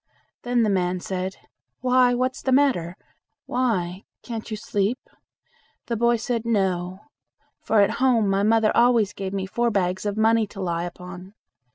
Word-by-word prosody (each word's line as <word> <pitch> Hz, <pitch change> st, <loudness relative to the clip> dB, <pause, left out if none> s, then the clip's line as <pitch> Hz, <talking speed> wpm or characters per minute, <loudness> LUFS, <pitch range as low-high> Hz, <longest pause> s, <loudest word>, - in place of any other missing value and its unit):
Then 245 Hz, -1 st, +1 dB
the 215 Hz, -, +2 dB
man 180 Hz, -1 st, 0 dB
said, 185 Hz, +1 st, -4 dB, 0.5 s
"Why, 250 Hz, -1 st, +4 dB
what's 255 Hz, +1 st, -1 dB
the 265 Hz, -, -1 dB
matter? 250 Hz, -11 st, +2 dB, 0.5 s
why, 195 Hz, -7 st, -1 dB, 0.2 s
can't 230 Hz, -2 st, -6 dB
you 215 Hz, -, -4 dB
sleep?" 210 Hz, +2 st, -1 dB, 0.9 s
The 235 Hz, -, -2 dB
boy 235 Hz, +1 st, +3 dB
said 230 Hz, 0 st, -2 dB
"No; 190 Hz, -4 st, -1 dB, 0.6 s
for 220 Hz, -2 st, +2 dB
at 200 Hz, -, +3 dB
home 240 Hz, -5 st, +3 dB
my 195 Hz, 0 st, +1 dB
mother 220 Hz, +1 st, +3 dB
always 235 Hz, -4 st, +4 dB
gave 195 Hz, -1 st, -5 dB
me 195 Hz, -1 st, -2 dB
four 235 Hz, +5 st, 0 dB
bags 190 Hz, -1 st, -1 dB
of 205 Hz, 0 st, -3 dB
money 220 Hz, 0 st, +3 dB
to 200 Hz, -, -12 dB
lie 170 Hz, -2 st, -2 dB
upon. 180 Hz, +2 st, -10 dB
210 Hz, 160 wpm, -24 LUFS, 190-235 Hz, 0.9 s, Why